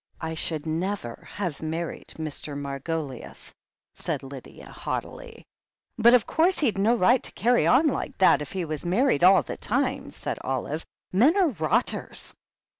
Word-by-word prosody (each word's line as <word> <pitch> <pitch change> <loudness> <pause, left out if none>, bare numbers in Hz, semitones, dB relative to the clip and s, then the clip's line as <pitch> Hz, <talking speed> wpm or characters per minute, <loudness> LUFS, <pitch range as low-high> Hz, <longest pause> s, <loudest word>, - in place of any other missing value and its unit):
"I 160 0 -4
should 160 -1 -2
never 160 - -3
have 180 -7 -4
married 160 +1 -4
Mr. 155 -2 -5
Margoliouth," 140 0 -5 0.4
said - - -4
Lydia 135 -1 -11
haughtily. 465 -2 -6 0.5
"But 235 +2 +6
of 235 - +3
course 345 +4 +2
he'd 230 -9 0
no 220 +5 +4
right 240 +4 +4
to - - -8
carry 245 +1 +2
on 265 +6 +5
like 295 - -1
that 185 - +5
if 150 - -6
he 185 -3 -2
was 155 -2 -5
married 185 - +2
all 185 -2 +7
the - - -6
time," - - -1
said - - -5
Olive. 135 +4 -3 0.3
"Men 265 - +4
are 370 -5 +4
rotters 160 - -2
175 Hz, 155 wpm, -26 LUFS, 150-235 Hz, 0.5 s, all